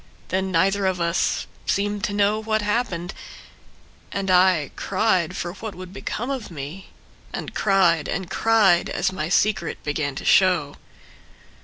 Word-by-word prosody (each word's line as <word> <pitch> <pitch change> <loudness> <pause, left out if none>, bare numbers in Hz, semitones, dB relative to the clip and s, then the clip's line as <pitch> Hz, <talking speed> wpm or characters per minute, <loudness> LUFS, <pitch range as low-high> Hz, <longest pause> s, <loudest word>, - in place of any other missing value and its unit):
Then 190 0 -1
neither 190 +3 +2
of 185 -1 -1
us 170 +1 0 0.2
Seemed 205 +1 0
to 205 - -3
know 205 +1 +2
what 220 -1 0
happened. 205 -5 -1 1.0
And 195 -1 -1
I 180 -5 +4
cried 190 -4 0
for 175 0 -4
what 215 +1 -7
would 185 0 -9
become 240 +5 -4
of 260 -5 -4
me. 160 +4 -8 0.4
And - - -6
cried 175 -6 +3
and 190 0 -3
cried 200 -3 +3
as - - 0
my 160 -4 -3
secret 195 -2 +1
began 145 -2 -2
to - - -6
show. 180 -7 +3
190 Hz, 145 wpm, -23 LUFS, 170-205 Hz, 1.0 s, I